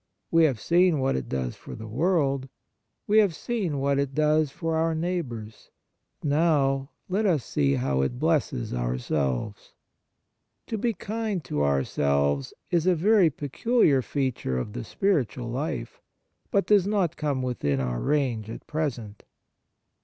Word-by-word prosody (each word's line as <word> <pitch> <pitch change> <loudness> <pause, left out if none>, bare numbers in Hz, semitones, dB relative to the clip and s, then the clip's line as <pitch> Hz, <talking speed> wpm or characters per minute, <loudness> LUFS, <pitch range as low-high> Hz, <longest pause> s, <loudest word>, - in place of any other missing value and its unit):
We 165 -1 +6
have 135 -8 +1
seen 175 +4 +3
what 135 0 +1
it 65 -2 -4
does 65 -2 -2
for - - -10
the 110 - -8
world. 135 - +1 0.6
We 215 +1 +4
have 200 -6 +3
seen 195 -11 -2
what 140 0 +1
it 140 -1 -2
does 155 0 +3
for 165 +4 -3
our 165 0 +1
neighbours. 145 -11 -4 0.5
Now 145 -3 +2 0.2
let 205 +3 +1
us 155 -9 +1
see 70 -1 +1
how 65 +1 0
it 65 -2 -1
blesses - - 0
ourselves. 65 - -2 0.9
To 225 - -3
be 235 +2 +1
kind 215 -2 -3
to 75 - -2
ourselves 70 0 +1 0.2
is 170 0 +2
a 185 - +5
very 190 +1 +4
peculiar 145 - +2
feature 130 - -2
of 105 +12 -4
the - - -5
spiritual 130 - -1
life, 125 - -4 0.5
but 200 - +2
does 200 -3 +4
not 195 -6 +1
come 145 -5 -1
within 75 - -1
our 60 -2 -2
range 120 - 0
at - - -8
present. 120 -9 -4
140 Hz, 145 wpm, -26 LUFS, 105-170 Hz, 0.9 s, We